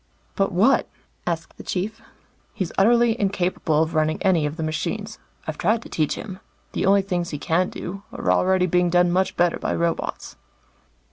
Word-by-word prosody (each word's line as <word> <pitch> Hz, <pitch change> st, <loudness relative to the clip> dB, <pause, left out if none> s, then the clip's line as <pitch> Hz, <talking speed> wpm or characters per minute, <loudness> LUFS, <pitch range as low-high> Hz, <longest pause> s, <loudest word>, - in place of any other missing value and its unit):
"But 195 Hz, -1 st, +1 dB
what?" 210 Hz, +9 st, +3 dB, 0.4 s
asked 170 Hz, -1 st, -3 dB
the -, -, -9 dB
Chief. 205 Hz, +5 st, -3 dB, 0.5 s
"He's 185 Hz, -4 st, -2 dB
utterly 235 Hz, +3 st, +4 dB
incapable 180 Hz, -5 st, +1 dB
of 160 Hz, +1 st, -4 dB
running 155 Hz, 0 st, +1 dB
any 175 Hz, -6 st, +3 dB
of 150 Hz, +2 st, -6 dB
the 160 Hz, -, -2 dB
machines. 205 Hz, +7 st, -3 dB, 0.3 s
I've 155 Hz, -1 st, -5 dB
tried 220 Hz, +5 st, +1 dB
to -, -, -11 dB
teach 155 Hz, -2 st, 0 dB
him. 190 Hz, -3 st, -7 dB, 0.3 s
The -, -, -1 dB
only 200 Hz, 0 st, +5 dB
things 175 Hz, -3 st, -2 dB
he 145 Hz, -, -4 dB
can 170 Hz, +5 st, +1 dB
do, 195 Hz, +3 st, -6 dB
are -, -, -1 dB
already 185 Hz, 0 st, +3 dB
being 180 Hz, 0 st, +2 dB
done 175 Hz, 0 st, +3 dB
much 185 Hz, +2 st, 0 dB
better 175 Hz, -1 st, +2 dB
by -, -, -1 dB
robots." 170 Hz, 0 st, -2 dB
180 Hz, 180 wpm, -23 LUFS, 165-195 Hz, 0.5 s, only